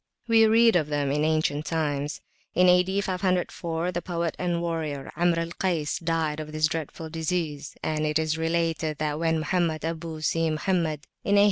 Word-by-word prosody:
We 225 Hz, -1 st, +6 dB
read 225 Hz, 0 st, +5 dB
of 160 Hz, -4 st, +2 dB
them 145 Hz, -2 st, 0 dB
in 150 Hz, +1 st, +1 dB
ancient 155 Hz, -1 st, +1 dB
times. 150 Hz, -3 st, -1 dB, 0.3 s
In 180 Hz, +1 st, +5 dB
A.D. 180 Hz, +2 st, +4 dB
504, 180 Hz, -2 st, -1 dB
the 175 Hz, -1 st, -3 dB
poet 170 Hz, -2 st, -2 dB
and 175 Hz, -1 st, 0 dB
warrior, 160 Hz, -5 st, -3 dB
Amr 170 Hz, +1 st, +2 dB
al 165 Hz, 0 st, -2 dB
Kays, 170 Hz, -5 st, -1 dB
died 160 Hz, -2 st, -1 dB
of 155 Hz, 0 st, -6 dB
this 155 Hz, 0 st, +2 dB
dreadful 160 Hz, +1 st, -3 dB
disease, 160 Hz, -3 st, -2 dB
and 155 Hz, -1 st, -1 dB
it 150 Hz, 0 st, +1 dB
is 160 Hz, 0 st, 0 dB
related 165 Hz, -1 st, 0 dB
that 150 Hz, 0 st, -1 dB
when 165 Hz, -1 st, +2 dB
Mohammed 160 Hz, -1 st, 0 dB
Abu 165 Hz, -1 st, -4 dB
Si 165 Hz, +1 st, +1 dB
Mohammed, 155 Hz, -2 st, -1 dB, 0.2 s
in 200 Hz, 0 st, +3 dB
A. -, -, +7 dB
165 Hz, 175 wpm, -26 LUFS, 155-175 Hz, 0.3 s, A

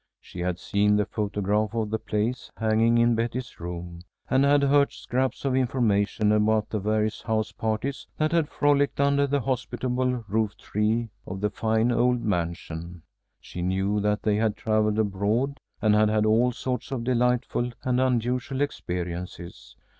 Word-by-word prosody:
She -, -, -11 dB
had 90 Hz, 0 st, -1 dB
seen 105 Hz, +2 st, +2 dB
the 105 Hz, 0 st, +2 dB
photograph 105 Hz, +1 st, -1 dB
of 110 Hz, -2 st, -1 dB
the 110 Hz, -, 0 dB
place 110 Hz, +5 st, -2 dB
hanging 115 Hz, +1 st, +3 dB
in 120 Hz, 0 st, +4 dB
Betty's 120 Hz, +2 st, -3 dB
room, 85 Hz, 0 st, -6 dB, 0.3 s
and 130 Hz, +1 st, +4 dB
had 140 Hz, 0 st, +4 dB
heard 140 Hz, 0 st, +4 dB
scraps 130 Hz, +2 st, -2 dB
of 130 Hz, -2 st, +1 dB
information 110 Hz, -5 st, +1 dB
about 105 Hz, 0 st, +2 dB
the 110 Hz, -, -1 dB
various 110 Hz, +1 st, 0 dB
house 110 Hz, -1 st, -1 dB
parties 110 Hz, +5 st, -3 dB
that 155 Hz, 0 st, +1 dB
had 165 Hz, -3 st, +1 dB
frolicked 145 Hz, -1 st, +2 dB
under 140 Hz, 0 st, +3 dB
the 140 Hz, 0 st, 0 dB
hospitable 125 Hz, -1 st, -1 dB
rooftree 110 Hz, +2 st, -1 dB, 0.2 s
of 95 Hz, +1 st, -5 dB
the 105 Hz, 0 st, 0 dB
fine 110 Hz, +2 st, +1 dB
old 125 Hz, +1 st, +2 dB
mansion. 85 Hz, -3 st, -3 dB, 0.4 s
She 90 Hz, -, -8 dB
knew 95 Hz, +3 st, 0 dB
that 105 Hz, +1 st, 0 dB
they 105 Hz, -1 st, +2 dB
had 110 Hz, -1 st, 0 dB
travelled 110 Hz, -1 st, +1 dB
abroad, 110 Hz, +7 st, 0 dB, 0.2 s
and 105 Hz, -1 st, +4 dB
had 105 Hz, 0 st, +4 dB
had 110 Hz, 0 st, +2 dB
all 115 Hz, +3 st, +3 dB
sorts 125 Hz, 0 st, -4 dB
of 125 Hz, -3 st, -2 dB
delightful 125 Hz, 0 st, +1 dB
and 125 Hz, 0 st, +1 dB
unusual 125 Hz, +1 st, 0 dB
experiences. 90 Hz, -8 st, -5 dB
110 Hz, 155 wpm, -26 LUFS, 105-125 Hz, 0.4 s, in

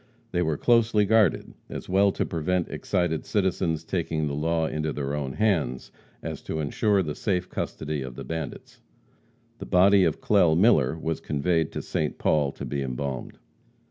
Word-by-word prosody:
They 90 Hz, -, 0 dB
were 80 Hz, -3 st, 0 dB
closely 115 Hz, -1 st, +3 dB
guarded, 110 Hz, -4 st, +2 dB, 0.2 s
as -, -, -7 dB
well 95 Hz, +2 st, +3 dB
to -, -, -1 dB
prevent 85 Hz, +2 st, -1 dB
excited 90 Hz, -5 st, -1 dB
citizens 90 Hz, -5 st, 0 dB
taking 80 Hz, -3 st, -2 dB
the 70 Hz, -, -2 dB
law 80 Hz, +2 st, 0 dB
into 75 Hz, 0 st, -2 dB
their 70 Hz, -1 st, -3 dB
own 70 Hz, -3 st, -3 dB
hands 80 Hz, -, 0 dB, 0.3 s
as -, -, -5 dB
to 80 Hz, -, -4 dB
insure 95 Hz, +7 st, +1 dB
the 75 Hz, -3 st, -3 dB
safe 90 Hz, -1 st, -1 dB
custody 75 Hz, -2 st, -4 dB
of 65 Hz, -2 st, -7 dB
the -, -, -7 dB
bandits. 80 Hz, -4 st, -6 dB, 0.8 s
The -, -, -7 dB
body 95 Hz, +2 st, +5 dB
of -, -, +1 dB
Clell 90 Hz, -7 st, +3 dB
Miller 80 Hz, -, +4 dB
was 80 Hz, 0 st, -3 dB
conveyed 80 Hz, +2 st, 0 dB
to -, -, -4 dB
St. 75 Hz, -, -2 dB
Paul 75 Hz, -3 st, +2 dB
to -, -, -7 dB
be 70 Hz, -1 st, -3 dB
embalmed. 65 Hz, 0 st, -4 dB
80 Hz, 170 wpm, -26 LUFS, 75-95 Hz, 0.8 s, body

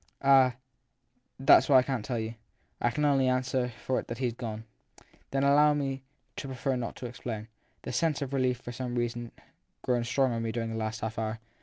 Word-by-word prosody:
Ah, 135 Hz, -2 st, +6 dB, 0.8 s
that 135 Hz, -, +8 dB
s -, -, -1 dB
what 140 Hz, -, +6 dB
I 130 Hz, -, +8 dB
can 130 Hz, -3 st, -2 dB
t -, -, -10 dB
tell 125 Hz, -3 st, -1 dB
you. 110 Hz, 0 st, -3 dB, 0.5 s
I 120 Hz, -, +3 dB
can 150 Hz, +6 st, 0 dB
only 135 Hz, -2 st, +3 dB
answer 130 Hz, -1 st, 0 dB
for 130 Hz, -, +1 dB
it -, -, -8 dB
that 115 Hz, -, -5 dB
he 130 Hz, -, -1 dB
s -, -, -6 dB
gone/ 110 Hz, -2 st, -5 dB, 0.3 s
1 -, -, -21 dB, 0.2 s
Then 135 Hz, 0 st, 0 dB
allow 145 Hz, +1 st, +5 dB
me 140 Hz, -2 st, -1 dB
also 135 Hz, 0 st, -6 dB, 0.4 s
to 140 Hz, -, -5 dB
prefer 130 Hz, 0 st, -1 dB
not 120 Hz, -2 st, -4 dB
to -, -, -7 dB
explain. 115 Hz, -2 st, -6 dB, 0.3 s
The -, -, -5 dB
sense 150 Hz, +3 st, +1 dB
of 140 Hz, 0 st, -6 dB
relief 130 Hz, -2 st, +1 dB
has 125 Hz, -, -25 dB
for 120 Hz, -, -4 dB
some 125 Hz, 0 st, -4 dB
reason 120 Hz, -1 st, -2 dB, 0.5 s
grown 120 Hz, -2 st, +1 dB
strong 125 Hz, +1 st, +1 dB
in 115 Hz, -, -2 dB
me 115 Hz, -1 st, -2 dB
during 115 Hz, -1 st, -3 dB
the -, -, -4 dB
last 110 Hz, -1 st, -3 dB
half 110 Hz, 0 st, -3 dB
hour. 110 Hz, 0 st, -2 dB
125 Hz, 235 wpm, -29 LUFS, 115-135 Hz, 0.8 s, that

